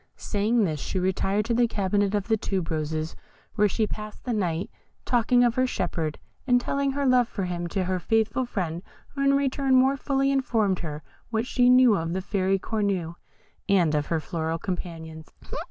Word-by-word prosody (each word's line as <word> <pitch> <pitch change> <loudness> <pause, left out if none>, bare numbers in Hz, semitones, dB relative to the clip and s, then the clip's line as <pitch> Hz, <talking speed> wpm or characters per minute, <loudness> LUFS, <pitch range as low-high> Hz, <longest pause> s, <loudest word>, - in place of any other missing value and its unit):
Saying 220 +2 0
this, 155 -6 -1
she 190 - -4
retired 190 +3 0
to 235 - 0
the 240 0 +3
cabinet 200 -1 0
of 205 -2 -1
the 225 - +3
tube 190 -5 -3
roses, 155 0 -2 0.4
where 210 -1 +3
she 220 +2 0
passed 210 0 -7
the 245 - -2
night 180 -5 -1 0.3
talking 245 0 +3
of 240 -1 +3
her 255 +1 +1
shepherd, 165 -8 -2 0.3
and 245 -1 +5
telling 275 +2 -1
her 280 0 -1
love 250 -2 +4
for 200 - -4
him 175 -1 -3
to 185 +2 -1
her 185 0 -1
faithful 225 +6 +1
friend, 175 -8 -3 0.3
who 275 - -5
in 275 0 +4
return 275 -1 +1
more 260 +2 +4
fully 275 0 0
informed 225 -8 +1
her 150 -2 -6 0.3
what 225 0 -1
she 250 -1 +3
knew 250 -3 +6
of 165 -1 -2
the 190 - -1
Fairy 195 -1 +1
Cornue 195 -5 -2 0.6
and 175 -6 +3
of 150 -1 0
her 165 - 0
floral 160 0 -3
companions. 160 -3 -6
205 Hz, 185 wpm, -26 LUFS, 175-245 Hz, 0.6 s, knew